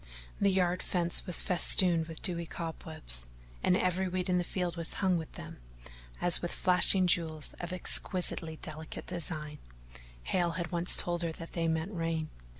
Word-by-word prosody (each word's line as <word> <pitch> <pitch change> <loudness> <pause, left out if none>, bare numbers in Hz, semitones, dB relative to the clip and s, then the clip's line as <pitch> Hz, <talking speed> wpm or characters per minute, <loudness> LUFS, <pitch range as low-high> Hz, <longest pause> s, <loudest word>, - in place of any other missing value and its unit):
The 200 - +1
yard 180 -2 -1
fence 175 +1 -2
was 180 - +2
festooned 175 -3 +2
with 165 -1 -11
dewy 170 -2 -2
cobwebs, 155 - -4 0.3
and 180 - +1
every 185 0 -2
weed 180 0 -4
in 180 0 0
the - - -2
field 175 -1 -5
was 165 -1 -6
hung 190 -2 -1
with 160 -2 -7
them - - -12 0.6
as 175 -1 +11
with 175 - -5
flashing 185 +1 +4
jewels 160 -4 -1
of 175 0 -7
exquisitely 180 -2 +2
delicate 155 0 -9
design: 155 -4 -7 0.6
Hale 175 -2 -2
had 175 0 -6
once 175 0 +1
told 175 0 -2
her 170 -1 -4
that 165 +1 -12
they 165 -1 -3
meant 160 +4 -3
rain. 165 -2 -4
175 Hz, 165 wpm, -29 LUFS, 160-180 Hz, 0.6 s, as